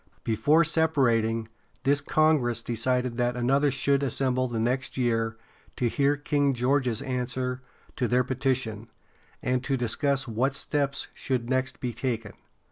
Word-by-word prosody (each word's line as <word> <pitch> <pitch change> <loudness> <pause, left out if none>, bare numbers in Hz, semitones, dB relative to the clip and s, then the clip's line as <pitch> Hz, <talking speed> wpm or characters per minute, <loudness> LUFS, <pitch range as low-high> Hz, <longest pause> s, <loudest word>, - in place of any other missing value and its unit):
Before 145 +9 +3
separating, 125 -9 +2 0.4
this 140 +2 +2
congress 140 -7 +2
decided 125 +1 0
that 120 0 0
another 135 +4 +2
should 140 +1 +1
assemble 130 -1 0
the 120 -2 -3
next 125 +5 -1
year 115 -2 0 0.4
to 125 - 0
hear 140 +4 +2
King 145 -1 +1
George's 125 -2 +1
answer 125 0 -2 0.4
to 125 - +1
their 125 +1 +3
petition, 125 -4 -1 0.5
and 125 0 0
to 135 0 0
discuss 135 +3 0
what 125 +5 0
steps 140 -2 -1
should 125 -2 -2
next 130 0 0
be 125 -2 -3
taken. 115 -3 -3
130 Hz, 135 wpm, -27 LUFS, 120-140 Hz, 0.5 s, Before